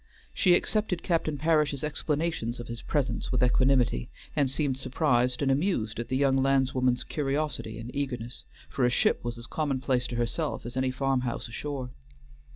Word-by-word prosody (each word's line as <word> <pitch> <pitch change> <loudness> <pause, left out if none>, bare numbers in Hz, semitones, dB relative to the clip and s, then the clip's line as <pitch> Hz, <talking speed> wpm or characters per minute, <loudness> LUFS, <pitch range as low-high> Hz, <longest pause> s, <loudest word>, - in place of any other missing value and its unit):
She 180 -2 +5
accepted 205 -3 0
Captain 160 -4 0
Parish's 150 -2 +2
explanations 150 -5 -1
of 120 - -7
his 115 0 -5
presence 145 -3 -1
with 125 -1 +2
equanimity, 125 - +3 0.3
and 140 -2 +3
seemed 135 -1 0
surprised 125 -2 +1
and 135 - +3
amused 135 - 0
at 120 - -3
the 130 - 0
young 135 -1 +3
landswoman's 130 -2 +2
curiosity 145 -5 -2
and 115 +2 -8
eagerness, 125 -4 -3 0.2
for 135 - -2
a 125 - +5
ship 125 - +2
was 120 0 -4
as 115 - -6
commonplace 130 -3 0
to 120 - -5
herself 120 +6 -2
as 120 - -6
any 130 0 +1
farm 135 0 +1
house 120 -2 -3
ashore. 130 +1 -5
135 Hz, 165 wpm, -28 LUFS, 125-145 Hz, 0.3 s, She